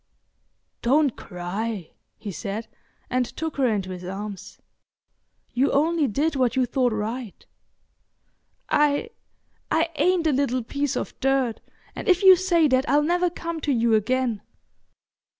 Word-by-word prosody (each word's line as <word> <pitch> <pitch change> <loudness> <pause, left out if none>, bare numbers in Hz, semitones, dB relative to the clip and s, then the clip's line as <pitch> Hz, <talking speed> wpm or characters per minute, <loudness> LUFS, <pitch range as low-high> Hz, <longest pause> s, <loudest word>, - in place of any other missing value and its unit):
"Don't 280 +2 +3
cry," 185 +1 -5 0.3
he 205 - -6
said, 200 +6 -5 0.4
and 255 0 +2
took 320 +5 -5
her 265 -2 +3
into 200 -5 -1
his 180 -1 -7
arms. 195 +2 -7 0.9
"You 260 +3 +2
only 310 +1 +2
did 290 +7 0
what 255 -2 +1
you 260 -1 +3
thought 250 0 +1
right." 220 +1 -4 1.2
"I—I 320 0 -1
ain't 360 -2 +2
a 315 - +4
little 255 -2 0
piece 280 +3 -2
of - - -4
dirt, 265 -4 +1 0.4
and - - -6
if 365 +1 +4
you 380 -1 +10
say 345 -3 +3
that 260 +1 +2
I'll 290 +2 +4
never 350 +3 +2
come 335 -1 -5
to 295 - 0
you 235 -3 +2
again." 230 0 +1
260 Hz, 135 wpm, -24 LUFS, 220-310 Hz, 1.2 s, you